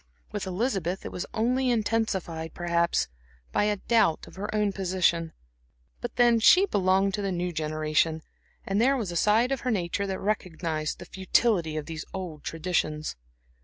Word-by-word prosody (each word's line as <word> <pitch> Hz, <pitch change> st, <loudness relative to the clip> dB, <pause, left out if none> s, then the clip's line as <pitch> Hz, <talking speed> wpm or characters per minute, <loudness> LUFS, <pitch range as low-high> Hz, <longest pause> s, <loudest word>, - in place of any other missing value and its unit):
With -, -, -4 dB
Elizabeth 190 Hz, -3 st, -1 dB
it -, -, -5 dB
was 180 Hz, -, -4 dB
only 250 Hz, +4 st, +1 dB
intensified, 205 Hz, -8 st, -1 dB
perhaps, 170 Hz, 0 st, +1 dB, 0.4 s
by -, -, +2 dB
a 210 Hz, 0 st, +2 dB
doubt 220 Hz, -6 st, +2 dB
of -, -, -14 dB
her 200 Hz, +2 st, -5 dB
own 210 Hz, -1 st, +1 dB
position. 180 Hz, -3 st, +1 dB, 0.7 s
But 240 Hz, -, -6 dB
then 240 Hz, -1 st, +5 dB
she 365 Hz, -, +7 dB
belonged 195 Hz, -, +2 dB
to 205 Hz, -, -1 dB
the 195 Hz, -1 st, -1 dB
new 180 Hz, 0 st, -2 dB
generation; 155 Hz, 0 st, 0 dB, 0.4 s
and 195 Hz, +2 st, +1 dB
there 270 Hz, +3 st, +4 dB
was 210 Hz, -8 st, -3 dB
a -, -, -6 dB
side 220 Hz, +8 st, +3 dB
of 270 Hz, -, 0 dB
her 250 Hz, -, -2 dB
nature 200 Hz, -1 st, -1 dB
that 190 Hz, -1 st, -3 dB
recognized 165 Hz, -6 st, -2 dB
the -, -, -10 dB
futility 185 Hz, -3 st, +1 dB
of 150 Hz, -, -3 dB
these 160 Hz, -1 st, -5 dB
old 175 Hz, -6 st, -6 dB
traditions. 155 Hz, -, -2 dB
190 Hz, 165 wpm, -27 LUFS, 165-215 Hz, 0.7 s, she